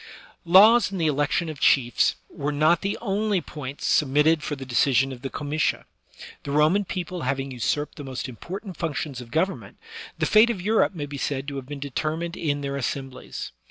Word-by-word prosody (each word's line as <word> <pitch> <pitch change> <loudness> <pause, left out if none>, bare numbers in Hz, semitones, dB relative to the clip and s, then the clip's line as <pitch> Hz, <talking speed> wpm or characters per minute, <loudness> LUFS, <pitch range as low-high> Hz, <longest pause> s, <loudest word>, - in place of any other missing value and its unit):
Laws 205 +6 +7
and 195 - -4
the 165 - +1
election 145 +3 +1
of 155 -3 -6
chiefs 120 -4 +3
were 145 +1 -4
not 155 +4 +3
the 200 +1 -2
only 205 -2 0
points 145 -4 -7
submitted 150 +3 +3
for 150 - -3
the 135 -1 -8
decision 135 +1 +2
of 125 -2 -9
the 135 - -4
comitia; 150 +2 -1 0.6
the - - -8
Roman 155 +8 +3
people 180 -1 -4
having 135 0 -2
usurped 140 +4 -2
the 145 - -7
most 130 -1 -5
important 180 - -8
func 160 -4 -2
tions 135 -4 -4
of 120 - -11
government, 175 +8 -2 0.4
the - - 0
fate 220 +2 +6
of 230 -5 -2
Europe 210 +1 +2
may 150 -3 -3
be 145 -1 -7
said 135 0 -2
to 140 - -6
have 130 -2 -7
been 145 -1 -6
determined 155 +5 -3
in 145 -3 -1
their 140 0 -3
assemblies. 135 0 -5
150 Hz, 195 wpm, -25 LUFS, 135-175 Hz, 0.6 s, Laws